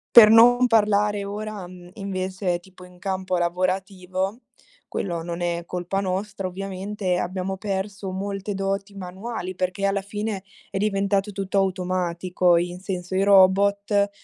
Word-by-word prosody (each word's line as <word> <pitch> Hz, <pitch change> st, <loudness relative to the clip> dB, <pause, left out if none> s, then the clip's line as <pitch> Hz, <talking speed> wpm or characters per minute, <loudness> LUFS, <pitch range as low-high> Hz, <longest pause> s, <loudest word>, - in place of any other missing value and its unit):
Per 215 Hz, -3 st, +11 dB
non 245 Hz, +2 st, +7 dB
parlare 210 Hz, -2 st, +3 dB
ora, 210 Hz, 0 st, -5 dB
uhm, 180 Hz, 0 st, -12 dB
invece, 185 Hz, -2 st, -2 dB
tipo, 185 Hz, 0 st, -16 dB
in 180 Hz, 0 st, -17 dB
campo 185 Hz, -1 st, -2 dB
lavorativo, 185 Hz, +3 st, -1 dB, 0.5 s
quello 170 Hz, -4 st, -3 dB
non 170 Hz, +1 st, -5 dB
è 170 Hz, 0 st, -1 dB
colpa 180 Hz, +2 st, -2 dB
nostra, 195 Hz, 0 st, -2 dB
ovviamente, 190 Hz, 0 st, -3 dB
abbiamo 185 Hz, +2 st, -2 dB
perso 195 Hz, 0 st, -3 dB
molte 195 Hz, +1 st, -3 dB
doti 195 Hz, +1 st, -2 dB
manuali 185 Hz, +1 st, -5 dB
perché 185 Hz, +2 st, -1 dB
alla 195 Hz, 0 st, +1 dB
fine 205 Hz, 0 st, -4 dB, 0.3 s
è 195 Hz, -, -3 dB
diventato 200 Hz, 0 st, +1 dB
tutto 195 Hz, 0 st, -2 dB
automatico. 180 Hz, -1 st, +1 dB
In 175 Hz, +1 st, -2 dB
senso, 185 Hz, -1 st, -5 dB
i 190 Hz, -, +3 dB
robot, 200 Hz, +1 st, +4 dB
190 Hz, 135 wpm, -24 LUFS, 185-200 Hz, 0.5 s, Per